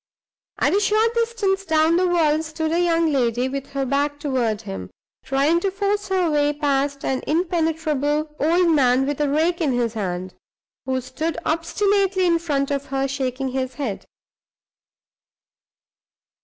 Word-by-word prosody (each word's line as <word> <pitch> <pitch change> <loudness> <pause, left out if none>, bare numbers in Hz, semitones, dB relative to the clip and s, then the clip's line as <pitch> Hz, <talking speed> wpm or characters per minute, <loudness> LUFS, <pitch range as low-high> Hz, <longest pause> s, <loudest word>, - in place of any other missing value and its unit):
At - - +2
a - - +4
short 435 +3 +2
distance 455 -5 0
down 320 -1 +3
the 365 +1 +2
wall 315 -3 +2
stood 315 0 -3
a 335 - +1
young 330 -2 +2
lady, 245 -1 +1
with 275 +1 -5
her 275 -1 -1
back 285 +2 0
toward 250 -7 -1
him, 195 -2 -6 0.3
trying 280 +5 +2
to 390 - 0
force 405 +1 -1
her 375 -2 +1
way 295 0 +2
past 280 -1 -1
an 265 -1 -1
impenetrable 310 -3 0
old 335 +3 +3
man, 260 -2 +3
with 290 +1 -2
a 290 - +1
rake 330 +4 +1
in 290 -5 +1
his 240 -2 0
hand, 185 -3 -4 0.5
who 260 0 0
stood 315 +6 -4
obstinately 385 +3 +1
in 335 -1 +3
front 285 -4 -1
of 280 0 -2
her, 270 0 -1
shaking 265 -1 -2
his 260 -1 -3
head. 245 -8 -4
300 Hz, 155 wpm, -22 LUFS, 270-340 Hz, 0.5 s, a